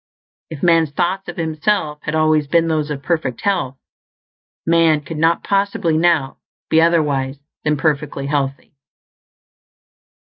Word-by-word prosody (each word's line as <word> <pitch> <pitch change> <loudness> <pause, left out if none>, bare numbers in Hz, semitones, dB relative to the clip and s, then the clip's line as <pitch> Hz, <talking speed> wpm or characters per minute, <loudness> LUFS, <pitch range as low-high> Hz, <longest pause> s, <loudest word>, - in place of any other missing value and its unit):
If 160 -3 -9
man's 165 -3 +4
thoughts 180 +6 -2
of 175 - -8
himself 160 0 -1
had 155 - -3
always 155 -2 +2
been 165 +2 +2
those 155 -2 -1
of 140 -2 -5
perfect 155 -7 -2
health, 175 -10 -1 0.9
man 165 -2 +3
could 150 +2 -7
not 165 +1 +2
possibly 195 -4 0
now 160 -5 +1 0.3
be 160 - +5
otherwise 145 -5 +1 0.3
than 150 0 +1
perfectly 145 -2 -1
healthy. 140 0 -2
155 Hz, 130 wpm, -19 LUFS, 145-170 Hz, 0.9 s, be